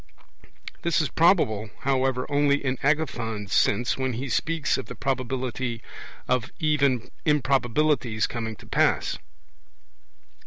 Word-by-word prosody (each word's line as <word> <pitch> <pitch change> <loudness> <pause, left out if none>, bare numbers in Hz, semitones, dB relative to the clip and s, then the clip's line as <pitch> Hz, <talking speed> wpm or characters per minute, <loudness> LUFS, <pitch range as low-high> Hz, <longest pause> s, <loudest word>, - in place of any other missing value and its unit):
This 170 -1 +1
is 155 - 0
probable, 135 - +3
however, 130 -1 +1
only 145 0 +2
in 130 -1 -1
Agathon's 115 -9 -1
sense, 120 +5 +2
when 130 -1 -1
he 130 +4 -4
speaks 160 +4 0
of - - -6
the - - -8
probability 130 -2 -2 0.4
of 125 -2 0
even 140 -6 +1
improbabilities 135 -4 +2
coming 110 -2 -4
to - - -16
pass. - - +1
130 Hz, 115 wpm, -25 LUFS, 120-145 Hz, 0.4 s, probable